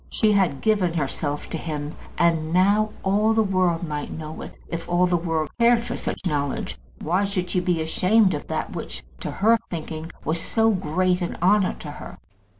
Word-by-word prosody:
She 215 -2 +2
had 185 -9 +2
given 195 -6 +2
herself 145 0 -2
to 165 - -2
him; 150 -2 -4 0.2
and 165 -2 +2
now 200 +4 +4
all 210 +3 +3
the 220 - +4
world 185 -4 +1
might 150 -1 -4
know 155 0 -7
it, - - -9
if 170 0 -5
all 175 +1 +3
the 180 -1 +2
world 165 -2 0
cared 235 0 +5
for 240 0 -4
such - - -4
knowledge. 145 -5 -1 0.3
Why 180 +5 +1
should 185 -3 -2
she 180 - +2
be 175 -3 0
ashamed 190 +5 +3
of - - -5
that - - -3
which, - - -5 0.2
to - - -4
her 225 +4 +3
thinking, 160 -1 -5
was 165 +1 0
so 225 +4 +2
great 185 0 +1
an 175 - -3
honour 190 +2 +3
to 150 - -6
her? - - -9
180 Hz, 190 wpm, -24 LUFS, 160-200 Hz, 0.3 s, cared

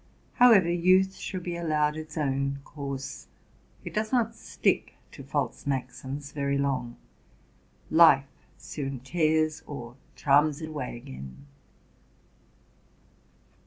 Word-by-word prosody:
However, 230 -8 +6
youth 185 +2 +4
should 185 -2 -6
be 175 -1 -3
allowed 155 -3 +1
its 155 0 -8
own 140 -1 0
course: 140 -2 -6 0.6
it - - -6
does 215 0 -1
not 235 -3 +2
stick - - -1 0.2
to - - -11
false - - -3
maxims 135 +1 -4
very 140 -1 -1
long; 130 -4 -1 1.0
life 155 -4 +7 0.3
soon 135 -4 -5
tears 155 +2 +1
or 120 -4 -7 0.2
charms 145 +1 +3
it 155 -1 -6
away 140 -6 -5
again. 70 - -10
145 Hz, 110 wpm, -28 LUFS, 135-170 Hz, 1.0 s, life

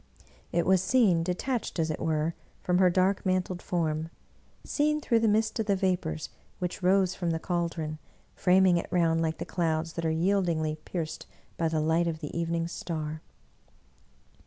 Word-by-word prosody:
It 170 0 +1
was 190 -1 +4
seen, 190 -5 +3
de 180 +2 -1
tached, 250 -1 -3
as 160 -1 +1
it - - -4
were, 160 +1 0 0.3
from 180 0 +2
her 185 -1 +6
dark 185 +2 +2
mantled 185 -1 -1
form; 160 -3 -1 0.5
seen 300 +1 +1
through 235 -6 +2
the 225 - +2
mist 220 +2 +1
of 220 - -1
the 200 - +3
vapors 180 - -1 0.3
which 180 +1 -4
rose 185 0 +3
from 175 -2 -2
the 165 - 0
caldron, 165 -3 -2 0.3
framing 185 -1 +4
it 170 - -3
round 165 -2 +2
like 160 -1 -1
the - - -5
clouds 165 -2 -1
that 165 - -4
are - - +1
yieldingly 160 -3 0
pierced 165 -4 -4 0.3
by 165 - 0
the 160 -1 0
light 160 +2 +2
of 165 -1 -2
the 150 -2 -7
evening 165 0 -1
star. 155 -2 -4
170 Hz, 175 wpm, -28 LUFS, 160-185 Hz, 0.5 s, her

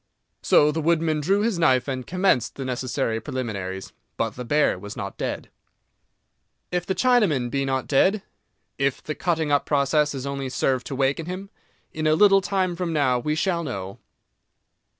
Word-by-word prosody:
So 150 +1 +4
the 160 +2 -2
woodman 160 -1 +1
drew 195 +7 +2
his 215 -5 0
knife 130 -6 +3
and 130 -2 -4
commenced 180 - +1
the 135 - -5
necessary 125 -2 -2
preliminaries. 100 -7 -5 0.2
But 115 -1 0
the 125 +4 -7
bear 145 -5 +2
was 105 +2 -8
not 100 0 -5
dead. - - -4 1.2
If 180 0 -2
the 190 - 0
Chinaman 195 - +2
be 135 -1 0
not 130 -1 -1
dead? 190 +9 +2 0.6
If 140 -1 0
the 155 - -3
cutting 160 -3 -1
up 145 - +2
process 145 +1 +2
has 135 -1 -5
only 140 -1 -3
served 130 0 0
to 135 - -4
waken 140 +4 0
him? 190 +2 -6 0.4
In 155 0 -1
a 155 - +4
little 195 +2 +6
time 185 -2 -1
from 175 -1 -3
now 130 -5 +2
we 150 +5 -1
shall 170 +1 0
know. 100 - -6
145 Hz, 170 wpm, -24 LUFS, 130-170 Hz, 1.2 s, little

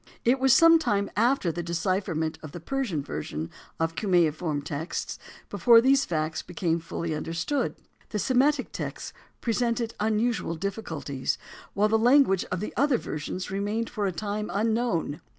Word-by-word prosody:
It 250 +3 +4
was 265 0 +4
some 330 +4 +7
time 200 -9 0
after 230 -5 +2
the 175 - -4
decipherment 170 -1 -1
of 155 -2 -9
the 175 - -6
Persian 195 - -2
version 75 - -5 0.3
of 165 0 +1
the - - -23
cuneiform 165 -6 +1
texts 150 +3 -4 0.3
before 235 -2 +6
these 270 +3 +4
facts 160 -1 -2
became 170 -1 -1
fully 165 0 -4
understood. 165 - -2 0.3
The 215 - -3
Semitic 260 +6 +2
text - - -5 0.3
presented 230 0 0
unusual 220 -4 0
difficulties, 160 - -3 0.4
while 205 +2 +3
the 220 +1 +3
language 240 -5 +4
of 180 0 -4
the 210 - -4
other 280 -1 +3
version 155 -2 -5
remained 205 +4 -2
for 210 -3 -1
a - - 0
time 210 +4 -3
unknown. 220 -8 0
200 Hz, 150 wpm, -27 LUFS, 165-235 Hz, 0.4 s, some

